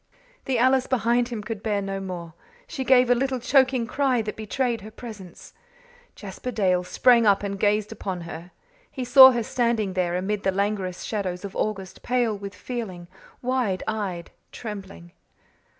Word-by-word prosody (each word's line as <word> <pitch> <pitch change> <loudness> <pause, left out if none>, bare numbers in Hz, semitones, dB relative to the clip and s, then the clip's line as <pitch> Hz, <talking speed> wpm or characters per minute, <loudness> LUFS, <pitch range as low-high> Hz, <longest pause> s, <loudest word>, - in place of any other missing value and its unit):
The 265 -2 0
Alice 260 +2 +3
behind 240 -1 +1
him 230 -4 -5
could 215 -1 -5
bear 210 -2 0
no 195 0 -4
more. 175 -4 -6 0.3
She 265 - -5
gave 250 -1 +4
a - - +8
little 260 +1 -1
choking 260 -1 +3
cry 255 -1 +1
that 210 - -5
betrayed 235 +2 -2
her 210 - -9
presence. 210 -6 -11 0.6
Jasper 205 +4 -7
Dale 185 -6 +1
sprang 235 +4 +4
up 200 0 +4
and 200 -1 -4
gazed 210 +1 +1
upon 190 -4 -5
her. 170 +1 -8 0.4
He 260 -2 -5
saw 260 +1 +10
her 240 -2 0
standing 230 -4 0
there, 180 -2 0
amid 200 +2 -2
the 190 - +1
languorous 195 -2 -2
shadows 190 -3 -3
of 195 - -8
August, 195 -3 -3
pale 245 -3 0
with 200 -1 -8
feeling, 185 -8 -6 0.3
wide 245 -7 0
eyed, 195 -6 -3 0.2
trembling. 195 -5 -8
215 Hz, 165 wpm, -24 LUFS, 190-245 Hz, 0.6 s, saw